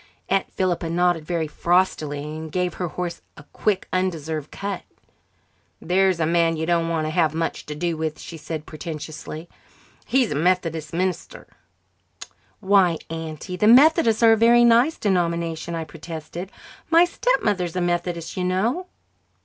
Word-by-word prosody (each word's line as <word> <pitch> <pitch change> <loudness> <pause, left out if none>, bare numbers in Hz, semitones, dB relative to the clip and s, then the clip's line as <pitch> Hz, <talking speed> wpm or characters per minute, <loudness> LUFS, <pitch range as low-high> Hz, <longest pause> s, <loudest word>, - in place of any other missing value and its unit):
Aunt 195 0 0
Philippa 175 -3 -1
nodded 175 -1 +1
very 170 -3 -1
frostily 155 -3 0
and 155 +1 -7
gave 180 0 -1
her 180 - -3
horse 175 +1 -5 0.2
a 150 - -12
quite 200 -3 0
undeserved 160 -5 -2
cut. 200 -2 -5 1.0
"There's 185 0 +2
a 160 - +2
man 165 0 +2
you 160 - -2
don't 170 -1 +1
want 160 -2 -1
to 155 - -2
have 160 -2 +1
much 165 0 -3
to 150 - -5
do 170 +2 -1
with," 155 -1 -3
she 165 - -9
said 155 -1 -6
portentously. 155 +1 -7 0.6
"He's 255 -3 +2
a - - -1
Methodist 165 -1 0
minister." 185 +2 -3 1.2
"Why, 190 -4 +4
Auntie, 165 +3 -6
the 210 - +2
Methodists 250 -2 +6
are 225 - +8
a - - +6
very 235 +2 +6
nice 240 +7 +4
denomination," 170 -3 -1
I 165 - -3
protested. 165 +3 -8 0.4
"My 335 +1 +6
stepmother 215 - 0
is 170 - -7
a - - 0
Methodist, 175 -1 -2
you 185 - -2
know." 220 - 0
175 Hz, 155 wpm, -23 LUFS, 160-190 Hz, 1.2 s, are